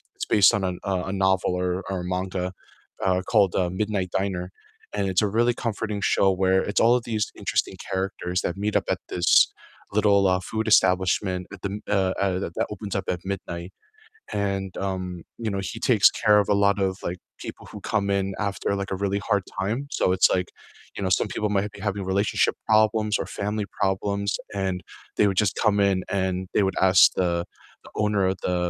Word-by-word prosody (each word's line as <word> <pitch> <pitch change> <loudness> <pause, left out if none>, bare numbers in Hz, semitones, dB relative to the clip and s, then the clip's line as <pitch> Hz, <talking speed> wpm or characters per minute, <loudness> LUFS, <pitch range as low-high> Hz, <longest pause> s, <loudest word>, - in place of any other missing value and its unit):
it's - - -4
based 105 +2 +5
on 100 -3 0
a 90 - -1
a 100 - -1 0.2
a - - -3
novel, 95 -1 +1
or 90 - 0 0.2
or 95 -2 -2
a - - -6
manga, 90 0 -2 0.5
uh, 95 -1 +2
called, 105 -6 +3
uh, 90 -2 +1
Midnight 95 -1 -2
Diner, 95 -2 -2 0.4
and 100 -1 -1
it's 95 +1 +2
a 105 - +2
really 120 +1 +4
comforting 110 -3 -3
show 100 - +3
where 95 0 +4
it's 100 - 0
all 120 +2 +5
of 120 - -1
these 110 -3 -1
interesting - - -1 0.2
characters 95 -1 -2
that 90 - -3
meet 105 +1 -2
up - - +2
at - - 0
this 85 -1 0 0.7
little, 100 -2 +4
uh, 95 0 +2
food 110 0 -2
establishment 90 0 +2
at 95 - -10
the 100 - -1
m 105 +1 -5
uh 95 -2 +1
uh, 95 -2 0
that 85 - -5
that - - 0
opens 100 -1 -6
up 95 - -7
at 90 - -6
midnight, 85 -2 -6 0.6
and, 100 -2 -1 0.2
um, 90 -2 -4 0.2
you 110 - 0
know, 100 - -2
he 115 - -7
takes 115 -4 +5
care 105 -2 +6
of 100 - -4
a - - +4
lot 100 0 +3
of, - - -1 0.2
like, 90 - -3 0.3
people - - -8
who - - -8
come 105 -2 +1
in 95 0 -1 0.2
after, 100 - -3
like, 100 - -4
a 95 - 0
really 100 0 0
hard 100 -3 +2 0.2
time, 105 +6 -1 0.2
so, - - -1
it's, 95 - +5
like, 90 -1 -2 0.5
you - - -4
know, 95 - 0
some - - -1
people 105 - -1
might 100 +1 -1
be - - -11
having 100 -1 -2
relationship 100 +2 +1
problems 110 0 +3
or - - -2
family 105 +1 -3 0.2
problems, 100 +1 0 0.3
and 95 -1 -1 0.4
they - - +5
would 95 - -1
just 95 - 0
come 105 -1 +4
in, 95 - +1 0.2
and 95 0 0 0.2
they 105 - +3
would 95 - -2
ask 95 0 +5 0.2
the 90 -1 +1 0.5
the - - -14
owner 105 -2 +1
of 95 - -5
the 90 - +1
100 Hz, 210 wpm, -25 LUFS, 95-105 Hz, 0.7 s, care